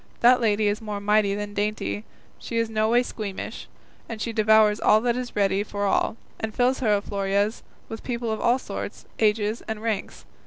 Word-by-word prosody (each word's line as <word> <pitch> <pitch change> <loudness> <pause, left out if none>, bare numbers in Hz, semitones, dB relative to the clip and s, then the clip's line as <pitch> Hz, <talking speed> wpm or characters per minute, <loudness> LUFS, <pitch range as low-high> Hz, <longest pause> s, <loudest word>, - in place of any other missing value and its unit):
That 250 +1 +6
lady 215 -1 +2
is 205 +3 0
more 210 -2 -4
mighty 205 0 +2
than 205 0 -5
dainty, 210 +1 -2 0.3
she 230 - -4
is 230 -1 +1
in - - -10
no 215 0 +2
way 240 +2 +4
squeamish, 210 -5 -6 0.5
she 225 +2 -3
devours 215 -1 +4
all 215 +3 +4
and 240 -1 +2
is 250 -1 -5
ready 195 -1 +2
for 205 0 -3
all, 200 - +1 0.2
and 220 -1 -4
fills 250 +2 +2
her 210 -5 +2
alforjas 200 +1 -1 0.3
with 225 - -7
people 235 -2 -2
of 220 - -3
all 240 +2 +3
sorts, - - -7
ages, 215 0 +1
and 220 0 -4
ranks. 220 -4 -3
215 Hz, 190 wpm, -25 LUFS, 205-230 Hz, 0.5 s, That